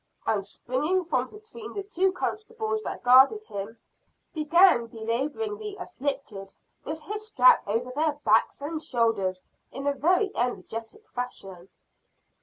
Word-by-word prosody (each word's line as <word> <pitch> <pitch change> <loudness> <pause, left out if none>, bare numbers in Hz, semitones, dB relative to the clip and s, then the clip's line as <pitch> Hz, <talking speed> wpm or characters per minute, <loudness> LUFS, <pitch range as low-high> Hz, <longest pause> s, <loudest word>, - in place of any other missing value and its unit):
and 205 -3 +1
springing 300 - -1
from 255 -6 0
between 435 +1 -11
the 400 - -3
two 385 -1 +1
constables 435 +3 -3
that - - -6
guarded 265 - +6
him, 205 - -7 0.6
began 315 -5 +5
belaboring 270 - -3
the 420 -2 -6
"afflicted" 270 - -5 0.3
with 310 +2 -5
his 425 +6 -5
strap 470 +3 +6
over 230 +5 -1
their 305 0 +2
backs - - +3
and 310 +2 -4
shoulders 210 -9 0 0.3
in 275 - -6
a 285 - +2
very 360 +8 +2
energetic 240 - -4
fashion. 195 -7 -7
290 Hz, 130 wpm, -27 LUFS, -, 0.6 s, guarded